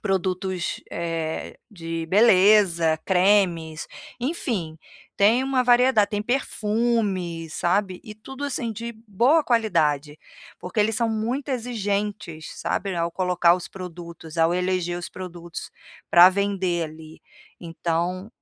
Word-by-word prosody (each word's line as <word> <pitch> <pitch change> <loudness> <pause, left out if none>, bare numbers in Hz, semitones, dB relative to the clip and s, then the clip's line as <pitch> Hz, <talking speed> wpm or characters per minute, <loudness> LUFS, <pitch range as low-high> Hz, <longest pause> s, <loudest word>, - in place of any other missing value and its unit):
produtos, 185 -2 -2
eh, 165 -1 -4
de 165 -4 -5
beleza, 185 -5 +4
cremes, 180 -4 +2 0.3
enfim, 235 - -3 0.4
tem 225 +6 +4
uma 265 -1 +1
variedade, 245 -3 +4
tem 205 - -1
perfumes, 210 - -1
sabe, 185 +2 0
e 215 - -9
tudo 265 +6 -10
assim 245 -5 -2
de 235 +2 -6
boa 250 - +3
qualidade, 155 - +1 0.4
porque 180 +4 -3
eles 220 +1 +1
são 230 0 +1
muito 235 +6 -2
exigentes, 210 - -3
sabe, 195 -2 -2
ao 170 0 -1
colocar 180 -2 +3
os 180 - -6
produtos, 170 -3 -9
ao 165 +1 +3
eleger 180 -1 -1
os 175 - -6
produtos 175 -2 -8 0.4
para 175 +1 +9
vender 190 -3 -1
ali, 155 0 -11 0.4
então 175 +3 -3
185 Hz, 115 wpm, -24 LUFS, 170-220 Hz, 0.4 s, para